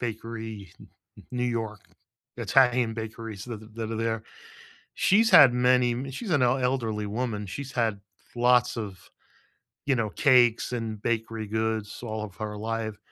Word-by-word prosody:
bakery, 110 -4 -6
N - - -14 0.3
N - - -14
New 125 0 -1
York, 110 -4 -3 0.6
Italian 125 -3 +3
bakeries 110 -2 -6
th 120 -3 -6
th 110 0 -14
that 115 -1 -4
are 115 - -3
there, 115 0 -1 0.7
she's 220 +4 +4
had 135 - +9
many 125 0 +3
mi 130 +3 -5
she's 195 - -6
an 145 -6 +3
el 125 +2 +3
elderly 115 -5 -1
woman. 110 -1 -3
She's 135 +8 -6
had 115 -5 0 0.3
lots 125 0 +3
of, 100 -4 -5 0.9
you 140 - +3
know, 110 -3 -1
cakes 120 - +3
and 115 -3 -4
bakery 115 -1 -2
goods 110 0 -2
all 110 -2 -4
of 100 -3 -10
her 105 -1 -5
life. 110 0 -3
115 Hz, 160 wpm, -27 LUFS, 110-125 Hz, 0.9 s, had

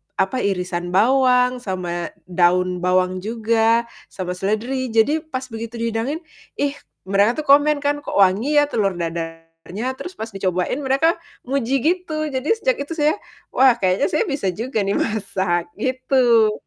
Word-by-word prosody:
apa, 190 +6 0
irisan 180 -3 -2
bawang, 250 +2 +4
sama 175 -5 -3 0.2
daun 180 0 +2
bawang 185 +1 +1
juga, 225 +2 +1 0.2
sama 180 -1 -5
seledri. 220 +8 -2
Jadi 290 +8 +3
pas 270 -4 -6
begitu 225 +1 -6
dihidangin 230 +8 -2 0.3
ih 285 0 0 0.3
mereka 200 +8 +2
tuh - - -20
komen 295 0 0
kan, 290 0 +1
"Kok 290 - -7
wangi 200 +10 +3
ya 290 - 0
telur 200 -7 0
dadarnya?" 165 +3 -6
Terus 360 - -7
pas 225 -9 -6
dicobain 185 +1 -1
mereka 275 +6 +2 0.2
muji 265 0 -1
gitu! 315 -2 -1
Jadi 270 - 0
sejak - - 0
itu 330 - -6
saya, 305 +4 +1 0.3
"Wah 260 -2 +5
kayaknya 185 0 +2
saya 305 - +2
bisa 275 -8 -2
juga 225 +1 -2
nih 200 - 0
masak." 190 -5 -1 0.2
Gitu, 255 -4 +3
225 Hz, 150 wpm, -21 LUFS, 185-270 Hz, 0.3 s, Wah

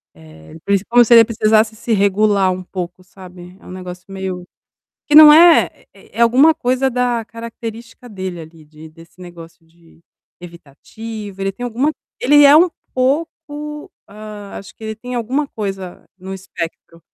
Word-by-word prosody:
Eh, 80 -1 -16
o 165 - -14
principal 200 +4 -1
seria - - -2
se 235 - +3
ele 230 -1 +8
precisasse 220 -1 +1
se 230 +1 -6
regular 200 -1 +2
um 185 0 -5
pouco, 180 0 -7
sabe, 180 -1 -14
é - - -21
um - - -11
negócio 180 -1 -9
meio 190 -2 -6 0.6
que 295 - -1
não 305 -1 +10
é 335 +2 +6 0.2
é - - -17
é - - -1
alguma 260 +7 +5
coisa 255 +1 -1
da 245 -2 -1
característica 230 +1 -10
dele 185 -4 -7
ali 160 0 -14
de 155 +1 -15
desse 165 +3 -19
negócio 170 -1 -13
de 165 0 -25 0.4
evitativo. 195 +6 -11
Ele 195 0 -1
tem 245 - -8
alguma 250 +6 -1 0.3
ele 290 +3 +5
é 285 +2 +7
um 350 +3 +5 0.2
pouco 300 +2 -3 0.2
hã, 210 -1 -11
acho 190 -1 -13
que - - -20
ele 220 0 -5
tem 250 +2 -8
alguma 255 +5 -2
coisa 195 -4 -7
no 190 +1 -9
espectro. 170 -2 -8
205 Hz, 170 wpm, -17 LUFS, 180-245 Hz, 0.6 s, não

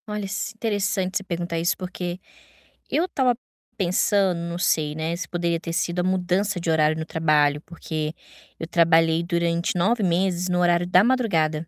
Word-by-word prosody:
Olha, 210 -1 -4
s 200 +2 -3
interessante 200 -4 -1
você 195 - -5
perguntar 170 -2 -3
isso, 170 +3 0
porque 180 -1 -5 0.7
eu 340 +3 +1
tava 255 -5 +1 0.4
pensando, 190 -1 +2
não 170 0 -4
sei, 150 -3 +1
né, 160 +2 -2
se 180 - -5
poderia 170 -1 -1
ter 165 0 -6
sido 175 +1 -1
a - - -2
mudança 185 +1 0
de 170 - -3
horário 155 0 +2
no 160 - -4
trabalho, 150 -3 +2
porque 155 -2 -5 0.5
eu 165 - -5
trabalhei 165 -1 +3
durante 170 0 0
9 210 +6 +2
meses 180 0 +1
no 180 0 +1
horário 175 0 +2
da 180 +1 +5
madrugada. 170 -11 +1
175 Hz, 170 wpm, -24 LUFS, 165-190 Hz, 0.7 s, da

